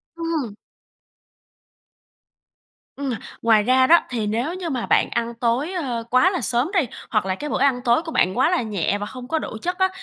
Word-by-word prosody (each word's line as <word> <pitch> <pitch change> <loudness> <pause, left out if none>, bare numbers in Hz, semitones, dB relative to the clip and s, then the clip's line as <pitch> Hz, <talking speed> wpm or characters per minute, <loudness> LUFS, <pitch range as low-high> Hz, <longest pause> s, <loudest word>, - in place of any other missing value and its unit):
Ừm. 325 -10 -3 2.4
Ừm, 280 -1 -3 0.3
ngoài 220 -2 +4
ra 260 +3 +4
đó, 340 +3 +7
thì 225 -4 -2
nếu 235 +10 -1
như 360 -2 -4
mà 255 -5 -2
bạn - - +2
ăn 235 0 -2
tối, 240 +7 0
ơ, 255 -10 -3
quá 255 +9 +4
là 360 - -2
sớm 250 +7 0
đi, 385 - +4 0.3
hoặc 215 -4 +1
là 190 -1 -1
cái 295 +9 -6
bữa - - -1
ăn 265 -2 +2
tối 240 +6 +3
của 325 - -6
bạn 185 - +1
quá 260 - +4
là 360 - +1
nhẹ 205 -4 -1
và 205 - -4
không 250 +3 -9
có 320 +4 0
đủ 220 - -6
chất 360 +1 -2
á, 375 0 +3
255 Hz, 205 wpm, -22 LUFS, 230-325 Hz, 2.4 s, đó